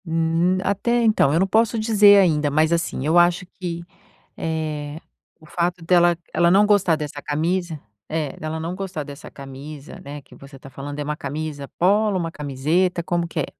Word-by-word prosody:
Hum, 165 +2 +1
até, 200 +4 -1
então, 215 -11 +3
eu 160 - +2
não 190 - +3
posso 225 +3 +2
dizer 210 -2 +6
ainda, 155 -6 +2
mas, 155 +3 +2
assim, 165 -5 -2
eu 165 +3 +4
acho 175 +1 +3
que, 170 -2 -4 0.5
eh, 155 -2 -4 0.4
o 160 - -18
fato 175 +2 -2
dela 175 -1 +4 0.2
ela 170 0 +3
não 200 +3 +5
gostar 200 -5 +3
dessa 150 -1 -6
camisa 165 +2 -2 0.3
é, 155 -3 -3
dela 155 +1 -4
não 165 +3 -4
gostar 190 -5 -5
dessa 140 0 -11
camisa, 140 +2 -10
né, 145 +1 -8
que 135 - -18
você 135 0 -14
tá 135 - -12
falando, 140 +2 -7
é - - -2
uma 150 +1 -3
camisa 150 -2 -5
polo, 205 +2 +3
uma 170 -2 -2
camiseta, 155 +6 0
como 175 0 -1
que 165 - -5
é? - - -1
165 Hz, 185 wpm, -22 LUFS, 150-180 Hz, 0.5 s, dizer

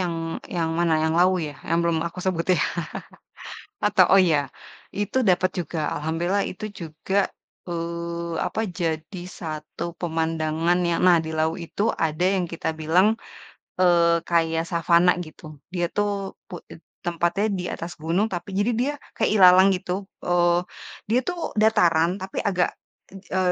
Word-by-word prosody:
yang 175 -2 -1 0.4
yang 165 -1 0
mana, 170 -1 +2
yang 160 +1 +1
Lawu 185 +1 +5
ya, 145 - -10
yang 165 - +2
belum 170 -1 +1
aku 170 - -7
sebutin 180 -2 +1
ya. - - +3 1.2
Atau - - +5
oh 195 - +7
ya, 145 -2 +1 0.5
itu 205 +5 -1
dapat 185 0 +3
juga, 170 0 -4 0.2
alhamdulillah 170 +6 0
itu 215 +3 -7
juga, 165 +3 -5 0.5
eee, 170 0 -4
apa, - - -4 0.2
jadi 165 +2 -2 0.2
satu 155 -2 -6 0.2
pemandangan 160 0 0
yang 170 -1 0
nah 180 -1 +6
di 160 0 -4
Lawu 160 +2 0
itu 170 +3 -5
ada 160 +1 -1
yang 185 -2 0
kita 165 -1 -3
bilang, 165 +5 +4 0.8
eee, 170 -2 +4
kayak 165 -1 +2
savana 170 +1 +4 0.2
gitu. 155 -1 -12 0.2
Dia 175 -1 0
tuh 205 0 +2 0.4
pu - - -10 0.5
tempatnya 175 +3 0
di 180 - -4
atas 170 +1 -6
gunung 170 +7 +1
tapi 175 +2 -5
jadi 205 +4 +2
dia 275 +4 +1 0.3
kayak - - +2
ilalang 185 -1 +7
gitu, 180 0 -5 0.4
eee, 175 -1 +3 0.5
dia 235 - +4
tuh 355 -1 -3 0.2
dataran 170 -6 +4
tapi 190 - -5
agak 180 -3 +1 0.4
e 190 -1 -5
170 Hz, 150 wpm, -24 LUFS, 165-185 Hz, 1.2 s, oh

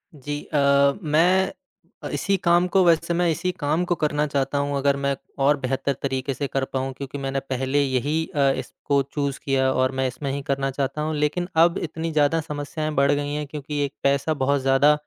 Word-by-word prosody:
जी 145 +1 -5
अ, - - +3 0.5
मैं 175 +5 +3 0.5
अ, - - -4
इसी 195 - +1
काम 175 -1 +3
को 185 +1 +3
वैसे 170 0 +3
मैं 175 0 +2
इसी 180 +3 -1
काम 155 +4 +1
को 175 - +2
करना 150 -1 0
चाहता 140 0 -1
हूँ 140 0 0
अगर 140 0 +2
मैं 140 0 +1 0.3
और 145 +1 +4
बेहतर 135 +1 -1
तरीके 135 0 -2
से 140 +3 -3
कर 135 0 -1
पाऊँ 135 0 -1
क्योंकि 140 +1 -7
मैंने 135 0 -2
पहले 135 +1 -1
यही 140 +5 0
अ, 140 -2 +4
इसको 140 -1 -1
चूज़ 140 -2 -2
किया 130 -1 +2
और 130 0 +1
मैं 130 - +2
इसमें 130 +2 -4
ही 140 - -3
करना 135 0 0
चाहता 140 +2 -2
हूँ, 155 0 -1
लेकिन 150 +4 0
अब 170 +1 +4
इतनी 165 0 -4
ज़्यादा 155 +1 +2
समस्याएँ 150 0 -4
बढ़ 140 0 +4
गई 145 0 -1
हैं 150 0 -2
क्योंकि 150 0 -5
एक 140 - -7
पैसा 140 +3 +2
बहुत 140 0 +2
ज़्यादा 135 +3 +4
145 Hz, 205 wpm, -23 LUFS, 135-155 Hz, 0.5 s, और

